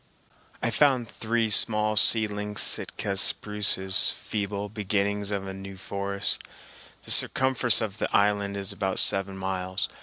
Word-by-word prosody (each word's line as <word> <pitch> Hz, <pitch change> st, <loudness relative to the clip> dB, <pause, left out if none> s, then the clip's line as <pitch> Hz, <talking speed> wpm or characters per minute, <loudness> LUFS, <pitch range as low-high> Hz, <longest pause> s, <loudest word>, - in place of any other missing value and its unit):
I -, -, -1 dB
found 130 Hz, -5 st, +1 dB
three 115 Hz, +1 st, -3 dB
small 110 Hz, +1 st, +4 dB
seedling 105 Hz, -1 st, +1 dB
Sitka 100 Hz, -, +2 dB
spruces, 100 Hz, -2 st, +1 dB
feeble 100 Hz, -1 st, -5 dB
beginnings 100 Hz, -1 st, -3 dB
of 100 Hz, -1 st, -4 dB
a 95 Hz, -, -7 dB
new 95 Hz, 0 st, -10 dB
forest. 100 Hz, +1 st, -4 dB, 0.6 s
The -, -, -4 dB
circumference 130 Hz, -4 st, +3 dB
of 110 Hz, -2 st, -6 dB
the -, -, -2 dB
island 100 Hz, -1 st, 0 dB
is 100 Hz, +1 st, -6 dB
about 95 Hz, -1 st, -4 dB
seven 95 Hz, 0 st, +2 dB
miles. 95 Hz, -1 st, -4 dB
100 Hz, 130 wpm, -25 LUFS, 95-105 Hz, 0.6 s, small